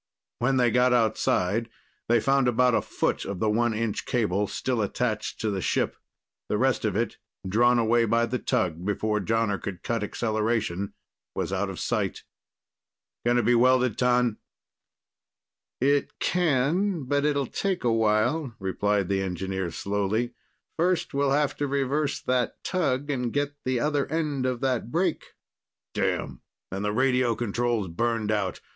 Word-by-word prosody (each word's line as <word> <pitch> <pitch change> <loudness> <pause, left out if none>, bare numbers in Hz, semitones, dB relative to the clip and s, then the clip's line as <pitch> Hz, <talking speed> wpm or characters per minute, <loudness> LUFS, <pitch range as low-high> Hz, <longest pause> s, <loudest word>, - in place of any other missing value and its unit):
When 130 +2 +2
they 120 -2 +3
got 125 +2 +4
outside, 110 -2 +1 0.4
they 120 0 +5
found 135 +2 +2
about 125 +1 +3
a - - +3
foot - - -1
of 100 -2 -5
the 110 +2 +2
one 115 +1 +1
inch 110 -1 -2
cable 105 -4 +1
still 125 +1 -1
attached 110 +1 -2
to 110 - 0
the 95 -2 -2
ship. - - 0 0.5
The 105 - +1
rest 130 -1 +1
of 105 -3 0
it, 115 +2 -1 0.3
drawn 120 +5 +4
away 115 0 +3
by 115 +1 +2
the 125 +2 -2
tug 85 -5 -1
before 105 +2 0
Jonner 110 -2 0
could 95 -3 -6
cut 115 -2 -1
acceleration, 110 -3 -1 0.4
was - - -2
out - - -1
of - - -6
sight. - - -1 1.0
"Can 120 0 +4
it 120 - +2
be 120 - +4
welded, 125 -1 +4
T'an?" 125 -3 +2 1.4
"It 140 +2 +1
can, 175 +2 +1
but 140 +2 0
it'll 145 -2 +1
take 190 +8 -2
a 120 -2 +2
while," 115 +5 +1
replied 100 0 0
the 95 0 0
engineer 95 0 -3
slowly. 105 +7 -1 0.4
"First, 175 +1 +1
we'll 140 0 +2
have 145 0 +1
to 145 - -1
reverse 140 +1 0
that 125 -1 -1
tug 145 -6 0
and 125 -4 -1
get 145 +1 -1
the 130 -1 +1
other 145 0 0
end 150 -4 -1
of 125 -2 -2
that 125 -4 0
break." 170 +4 -1 0.6
"Damn, 65 -3 -1 0.3
and 95 +2 -3
the 105 - 0
radio 125 0 +2
control's 120 -2 -1
burned 110 +4 -1
out. 100 -4 -1
120 Hz, 155 wpm, -26 LUFS, 105-135 Hz, 1.4 s, they